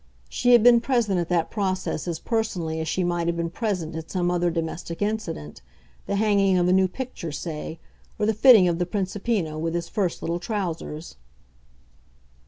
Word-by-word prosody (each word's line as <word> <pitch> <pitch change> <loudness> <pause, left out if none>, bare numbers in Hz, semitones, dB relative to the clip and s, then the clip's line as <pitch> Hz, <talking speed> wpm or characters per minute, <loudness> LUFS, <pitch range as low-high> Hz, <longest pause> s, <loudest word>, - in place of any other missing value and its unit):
She 245 0 +3
had 235 -3 +7
been 240 -1 +7
present 230 -7 +1
at 170 - -3
that 170 -2 0
process 190 -5 -2
as 170 -2 -2
personally 180 -8 -2
as 160 - -3
she 185 +3 0
might 175 -1 -1
have 170 0 0
been 170 0 -2
present 185 -6 -3
at 160 0 -6
some 175 -2 0
other 175 0 +1
domestic 165 0 -4
incident 205 - -3 0.5
the 200 - -1
hanging 200 -2 +3
of 175 0 +2
a 180 - +4
new 190 0 +4
picture, 210 -6 -6
say, 160 +1 -6 0.4
or 210 - 0
the 220 - +2
fitting 215 -4 +7
of 170 0 0
the 175 - 0
Principino 190 -3 -2
with 165 +1 -2
his 170 -1 -3
first 190 -5 -2
little 170 +1 -1
trousers. 170 - -4
180 Hz, 185 wpm, -24 LUFS, 165-210 Hz, 0.5 s, had